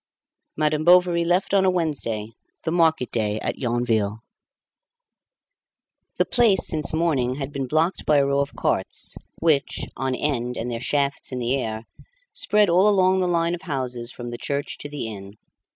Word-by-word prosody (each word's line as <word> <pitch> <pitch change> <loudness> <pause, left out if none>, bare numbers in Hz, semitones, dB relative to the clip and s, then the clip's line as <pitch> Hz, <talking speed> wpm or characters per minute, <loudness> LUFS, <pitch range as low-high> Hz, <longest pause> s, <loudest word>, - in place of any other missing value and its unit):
Madame 155 0 +1
Bovary 175 0 +5
left 180 +3 +1
on 195 -1 +4
a 190 - +4
Wednesday, 140 -11 -2 0.3
the 160 - -1
market 160 -6 +2
day 105 -2 0
at - - -3
Yonville. 115 -3 0 1.9
The - - +3
Place 220 -7 +3
since 155 -3 0
morning 150 -6 0
had 140 0 -5
been 135 -2 -3
blocked 160 +7 0
by 150 - +5
a 140 - +4
row 140 0 +1
of 140 0 -2
carts, - - -1 0.3
which, 155 -4 +1
on 130 -1 -1
end 125 -4 -2
and 120 +2 -3
their 115 -1 -4
shafts 140 +1 -1
in 130 - -4
the 125 +1 0
air, 110 -4 -3 0.5
spread 210 0 +2
all 185 +4 +4
along 190 -2 +3
the 180 - +1
line 170 -1 +1
of 175 - -5
houses 130 -7 -4
from 120 -1 -7
the 120 - -6
church 140 +2 -3
to 145 - -6
the 145 -4 -5
inn. 100 -2 -9
140 Hz, 170 wpm, -23 LUFS, 120-170 Hz, 1.9 s, Bovary